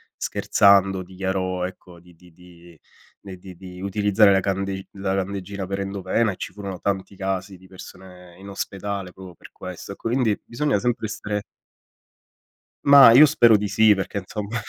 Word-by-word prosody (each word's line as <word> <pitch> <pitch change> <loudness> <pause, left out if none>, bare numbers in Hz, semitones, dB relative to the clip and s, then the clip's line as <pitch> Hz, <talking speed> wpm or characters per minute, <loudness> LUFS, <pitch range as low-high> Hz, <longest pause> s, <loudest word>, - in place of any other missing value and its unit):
scherzando 100 -1 +2
dichiarò 95 0 -3
ecco, 90 -1 -11
di 90 +1 -20
di 90 +1 -20
di 85 -1 -18 0.4
ne 95 -2 -10
di 90 0 -13
di 90 0 -11
utilizzare 100 +1 +3
la 95 - +3
candeg 95 0 -3
la 95 -1 -3
candeggina 95 0 -4
per 100 +1 -4
endovena, 100 +3 -1
e - - -8
ci - - -7
furono 100 -3 -7
tanti 100 0 -3
casi 95 0 -4
di 95 +1 -19
persone 90 -1 -14
in 100 - -12
ospedale 100 -1 -5
proprio 95 -1 -12
per - - -16
questo. 90 +1 -9
Ecco 100 - -7
quindi 120 -4 0
bisogna 135 -2 -1
sempre 120 -1 -2
essere 105 -1 -5 1.4
Ma 140 -4 +9
io 140 +6 +9
spero 120 -7 +4
di 105 0 -3
sì 105 +2 +4
perché 100 +1 -4
insomma. 105 +3 -5
95 Hz, 165 wpm, -22 LUFS, 95-105 Hz, 1.4 s, Ma